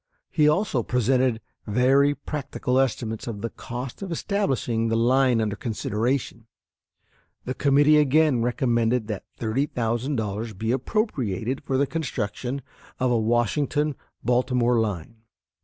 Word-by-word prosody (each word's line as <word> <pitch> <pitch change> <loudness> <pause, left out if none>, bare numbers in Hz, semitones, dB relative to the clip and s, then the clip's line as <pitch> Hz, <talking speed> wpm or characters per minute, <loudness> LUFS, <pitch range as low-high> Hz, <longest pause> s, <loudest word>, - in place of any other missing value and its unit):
He 155 -4 +3
also 155 - +1
presented 125 0 +1 0.3
very 135 +6 +3
practical 135 -4 -2
estimates 115 -4 -1
of 105 -4 -5
the 115 - -3
cost 125 +4 -7
of 195 -2 -5
establishing 135 - 0
the 115 - +1
line 125 +1 +3
under 105 -2 -1
consideration. 115 +1 -2 1.0
The 130 - -2
committee 145 +3 +4
again 150 -3 +4
recommended 120 -1 +1
that 105 -3 -4
$30,000 115 -3 -2
be 110 +3 -1
appropriated 130 - -1
for 135 - -1
the 140 - +3
construction 130 -3 -3 0.4
of 130 -1 +2
a 120 - +3
Washington 135 +6 +1 0.3
Baltimore 125 0 +2
line. 105 -2 -3
125 Hz, 120 wpm, -25 LUFS, 115-140 Hz, 1.0 s, committee